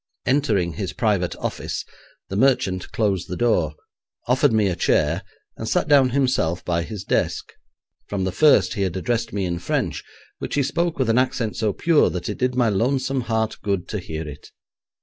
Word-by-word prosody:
Entering 130 - +1
his - - -4
private - - 0
office - - -4 0.4
the 95 - -5
merchant 100 -6 +1
closed 100 -5 0
the 90 - -4
door, 90 -11 +1 0.5
offered 130 +2 +3
me 110 -2 +3
a 90 - 0
chair, - - +1 0.4
and - - -4
sat - - +1
down 140 -3 +5
himself 125 -11 0
by 85 -1 0
his 100 +2 -6
desk. - - -1 0.5
From 100 -2 -2
the 95 - 0
first 150 +11 +4
he 100 - -3
had 95 -2 -1
addressed 115 +4 -1
me 100 -2 -1
in 85 -1 -2
French, 90 - -2 0.4
which - - -4
he 145 - +2
spoke 170 +5 -1
with 130 -4 +2
an 115 - +4
accent 120 -4 -1
so 110 -2 0
pure 165 +7 +3
that 90 +2 -4
it 105 - -5
did 125 0 0
my 125 -2 +3
lonesome 130 +5 0
heart 110 -2 -1
good 100 -4 -1
to 105 - -2
hear 80 -3 -6
it. 75 0 -10
110 Hz, 190 wpm, -23 LUFS, 90-130 Hz, 0.5 s, down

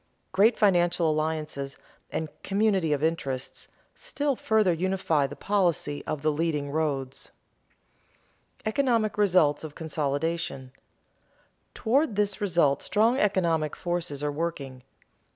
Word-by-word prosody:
Great 210 +5 +4
financial 175 -5 +3
alliances 155 -3 -3 0.3
and 160 - -3
"community 195 -5 +1
of 145 0 0
interests" 140 -5 -3 0.3
still 285 -1 -2
further 215 -6 +2
unify 170 -4 0
the 145 - -9
policy 170 -4 0
of 150 -2 -3
the 155 - +3
leading 150 -2 -1
roads. 140 -4 -2 1.3
[Sidenote: - - -27
Economic 225 -2 +1
results 175 -8 +3
of 155 -2 -8
consolidation] 150 -3 -2 1.0
Toward 245 +1 +1
this 205 0 0
result 170 -8 +2
strong 230 +5 +2
economic 170 - +1
forces 175 -5 -3
are 145 - 0
working. 145 -5 -4
165 Hz, 115 wpm, -27 LUFS, 145-200 Hz, 1.3 s, Great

